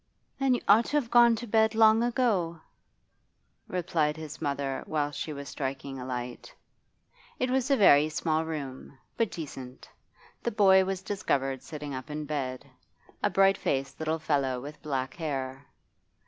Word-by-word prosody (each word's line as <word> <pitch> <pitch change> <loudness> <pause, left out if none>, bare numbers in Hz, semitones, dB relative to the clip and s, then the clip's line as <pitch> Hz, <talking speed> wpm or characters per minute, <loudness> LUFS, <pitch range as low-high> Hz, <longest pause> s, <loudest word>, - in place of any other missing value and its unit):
'Then 270 -2 +3
you - - -3
ought 220 +4 +6
to 295 - 0
have 245 -6 -2
gone 240 -1 +6
to 235 +2 -6
bed 220 0 +2
long 220 0 +6
ago,' 225 -9 +1 1.1
replied 165 -4 0
his 155 -1 -8
mother 140 -1 -2
whilst 145 -2 -2
she 155 - -4
was 140 -1 -7
striking 135 0 -5
a 125 - -6
light. 125 -1 -5 0.9
It 255 - 0
was 265 +1 +1
a 275 - +4
very 150 -7 +6
small 155 0 0
room, 140 -4 -6 0.2
but 230 -3 +1
decent. 135 -6 -8 0.5
The - - -1
boy 190 -4 +5
was 190 0 -3
discovered 135 -9 -1
sitting 145 +1 -7
up 130 +3 -6
in 150 0 -4
bed 135 -4 -3 0.6
a - - +2
bright 195 0 +4
faced 135 0 -2
little 160 0 -1
fellow 140 -5 0
with 145 +4 -9
black 130 -3 -3
hair. 135 -4 -4
155 Hz, 160 wpm, -28 LUFS, 135-205 Hz, 1.1 s, ought